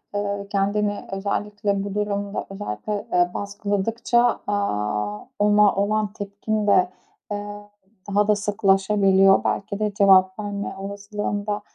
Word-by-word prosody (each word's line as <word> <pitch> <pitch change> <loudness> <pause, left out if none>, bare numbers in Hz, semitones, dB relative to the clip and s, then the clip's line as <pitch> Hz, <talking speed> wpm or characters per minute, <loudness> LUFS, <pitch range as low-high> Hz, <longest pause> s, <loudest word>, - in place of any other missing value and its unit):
eee, 200 -1 -2
kendini 205 +1 0
özellikle 200 0 -2
bu 200 -1 -5
durumda, 205 -1 -2
özellikle, 205 - -5
eee, 175 0 +3
baskıladıkça, 220 +4 0
aaa, 105 - -2
ona 210 0 +4
olan 205 +1 0
tepkin 205 +1 -3
de, 185 -3 +4 0.4
ııı, 205 0 -5 0.5
daha 205 +1 +2
da 210 - +4
sıklaşabiliyor. 195 -1 +3
Belki 200 0 -2
de 210 -1 -1
cevap 190 -1 +5
verme 205 -1 -4
olasılığında, 205 +1 -4
205 Hz, 110 wpm, -23 LUFS, 195-210 Hz, 0.5 s, cevap